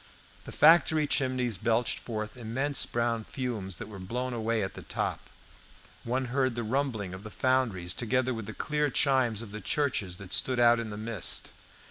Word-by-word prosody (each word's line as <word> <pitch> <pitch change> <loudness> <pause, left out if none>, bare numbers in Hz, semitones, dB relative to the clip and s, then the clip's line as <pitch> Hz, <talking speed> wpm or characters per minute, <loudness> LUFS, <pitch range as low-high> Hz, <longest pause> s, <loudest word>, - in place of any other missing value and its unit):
The - - -8
factory 160 0 +5
chimneys 130 -7 0
belched 115 +2 +1
forth 110 -1 -5
immense 130 +4 0
brown 115 -1 0
fumes 110 -8 -4
that 115 - -7
were 105 -3 -9
blown 125 +7 -3
away 115 -1 0
at 95 0 -4
the - - -9
top. - - -3 0.7
One 130 +2 -1
heard 130 -3 +1
the 120 - -2
rumbling 110 -5 -1
of 95 - -7
the 110 - -8
foundries, 110 -9 +1
together 125 +4 0
with 115 -3 -6
the 110 - -6
clear 150 +3 0
chimes 130 -5 +2
of 105 - -10
the 105 +1 -6
churches 110 -8 0
that 95 -1 -4
stood 130 -2 +3
out 120 0 +6
in 115 -2 -4
the 105 - -6
mist. 110 -3 -2
120 Hz, 180 wpm, -29 LUFS, 110-130 Hz, 0.7 s, out